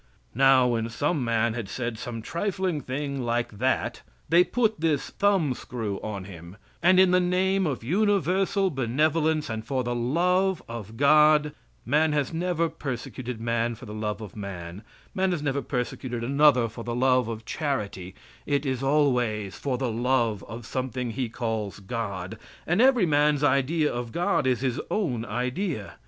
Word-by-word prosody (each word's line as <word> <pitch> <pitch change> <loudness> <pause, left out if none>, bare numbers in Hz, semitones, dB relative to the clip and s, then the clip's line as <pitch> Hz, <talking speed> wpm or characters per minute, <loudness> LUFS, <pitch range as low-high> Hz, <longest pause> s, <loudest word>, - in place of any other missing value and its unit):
Now, 135 0 +5
when 115 -1 -1
some 145 +4 -1
man 115 -1 +1
had 115 -4 -5
said 120 +1 -4
some 115 -2 -6
trifling 185 - -2
thing 140 +1 -3
like 120 -3 -2
that, 130 +2 0 0.3
they 170 +3 +6
put 220 -2 0
this 160 -3 0
thumb 195 -9 +2
screw 115 -6 -5
on 100 -3 -5
him, 90 0 -11 0.2
and 185 +2 +5
in 185 -1 +6
the 180 - +5
name 185 +1 +1
of 135 -6 -3
universal 195 - +1
benevolence 150 +4 +1
and 110 -3 -4
for 130 +2 -1
the 120 0 -2
love 180 +9 +1
of 115 -1 -8
God 150 +1 +5 0.3
man 150 +5 +2
has 145 0 0
never 170 0 0
persecuted 125 -4 -5
man 115 0 -1
for 120 - -12
the 105 - -8
love 105 0 -3
of 105 -5 -9
man; 95 -3 -7 0.3
man 190 0 +1
has 155 -4 -3
never 140 -1 0
persecuted 125 -2 -3
another 140 -1 +4
for 115 +1 -8
the 120 0 -3
love 125 -1 +3
of 115 -1 -6
charity 100 - -3 0.3
it 145 0 0
is 130 -2 -1
always 125 -8 +1
for 135 -3 -2
the 125 -3 -1
love 120 -3 0
of 115 +1 -8
something 125 -1 -3
he 125 0 -3
calls 110 -4 -3
God, 100 -1 -5 0.3
and 175 +6 +2
every 255 -6 +5
man's 150 -2 +2
idea 145 +3 +2
of 120 -1 -4
God 175 - +1
is 125 -2 +1
his 130 -2 -1
own 135 - -1
idea. 125 - -3
130 Hz, 165 wpm, -26 LUFS, 115-155 Hz, 0.3 s, they